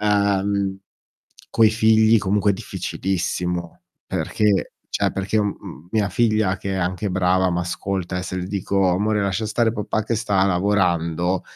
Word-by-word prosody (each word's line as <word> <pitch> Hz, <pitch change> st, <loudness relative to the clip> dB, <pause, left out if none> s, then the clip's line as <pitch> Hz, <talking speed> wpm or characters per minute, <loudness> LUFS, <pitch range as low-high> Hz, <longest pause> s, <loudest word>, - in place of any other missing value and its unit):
uhm, 100 Hz, -1 st, +1 dB, 0.7 s
coi 110 Hz, -1 st, +4 dB
figli 110 Hz, 0 st, +4 dB
comunque 100 Hz, +1 st, +1 dB
è -, -, +1 dB
difficilissimo. 90 Hz, -2 st, -3 dB, 0.3 s
Perché 105 Hz, -2 st, 0 dB, 0.3 s
cioè -, -, +1 dB
perché, 95 Hz, +3 st, 0 dB
mhmm, 100 Hz, -5 st, -6 dB
mia 105 Hz, -2 st, +1 dB
figlia, 110 Hz, -2 st, +1 dB
che 95 Hz, -, -5 dB
è -, -, -1 dB
anche 90 Hz, +2 st, -2 dB
brava, 95 Hz, 0 st, +2 dB
m'ascolta 90 Hz, +1 st, -3 dB
e -, -, -3 dB
se 95 Hz, 0 st, -5 dB
le 90 Hz, -1 st, -3 dB
dico: 95 Hz, 0 st, 0 dB
"Amore 105 Hz, +4 st, +1 dB
lascia 100 Hz, +2 st, -1 dB
stare 115 Hz, +1 st, +1 dB
papà 110 Hz, 0 st, -2 dB
che 115 Hz, -, -1 dB
sta 100 Hz, -3 st, +1 dB
lavorando", 90 Hz, -2 st, +1 dB
95 Hz, 145 wpm, -22 LUFS, 90-105 Hz, 0.7 s, coi